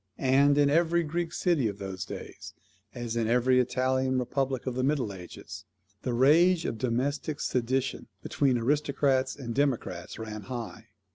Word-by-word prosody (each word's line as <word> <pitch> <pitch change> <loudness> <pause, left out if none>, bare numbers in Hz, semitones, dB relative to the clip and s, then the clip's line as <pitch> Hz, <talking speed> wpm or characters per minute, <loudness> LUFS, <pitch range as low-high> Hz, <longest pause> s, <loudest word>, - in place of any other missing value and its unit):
And, 140 +2 +4
in 145 -1 +5
every 170 +2 +3
Greek 170 +2 -2
city 170 -9 +1
of 100 -2 -4
those 95 -1 -5
days, - - -9 0.4
as 120 -2 -4
in 115 -1 0
every 125 +2 +3
Italian 130 +1 +1
republic 130 +1 -1
of 130 - -2
the 130 - -2
middle 135 -7 0
ages, 90 -2 -10 0.4
the 125 - -2
rage 165 +7 +4
of 110 - -3
domestic 140 +5 -1
sedition 130 +1 -1 0.2
between 135 -3 +1
aristocrats 140 +1 +1
and 120 -4 -6
democrats 140 -2 -1
ran 110 -1 -6
high. 120 -3 -7
130 Hz, 150 wpm, -28 LUFS, 120-145 Hz, 0.4 s, in